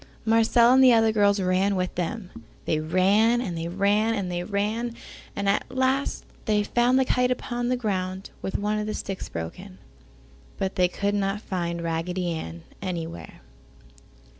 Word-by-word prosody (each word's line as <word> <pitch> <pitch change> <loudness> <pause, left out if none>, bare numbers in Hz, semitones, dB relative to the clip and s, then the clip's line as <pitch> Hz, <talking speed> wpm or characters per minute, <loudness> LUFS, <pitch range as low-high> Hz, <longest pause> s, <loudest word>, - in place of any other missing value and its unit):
Marcella 230 +2 +5
and 265 0 +6
the 255 -2 +8
other 225 -1 +4
girls 205 -1 +3
ran 190 +2 +1
with 185 0 -1
them. 180 +2 -4 0.3
They 155 - +1
ran, 195 +9 +3
and 195 -8 -3
they 165 0 -3
ran, 205 +5 +2
and 190 -4 -3
they 175 0 -2
ran, 215 +4 -2 0.4
and 200 0 -2
at 200 - +1
last 260 +2 0 0.2
they 210 -2 +2
found 240 +4 +2
the 265 - +3
kite 250 0 +2
upon 245 -1 -2
the 255 - +1
ground 190 -4 -3
with 190 - -2
one 210 +1 -1
of 210 - -3
the 215 - -3
sticks 195 -1 -5
broken, 180 - -7 0.8
but 190 0 -2
they 180 -2 +3
could 200 +3 -2
not 200 0 0
find 170 -4 -3
Raggedy 170 +2 -2
Ann 85 - -6 0.2
anywhere. 165 - -6
200 Hz, 165 wpm, -25 LUFS, 180-225 Hz, 0.8 s, the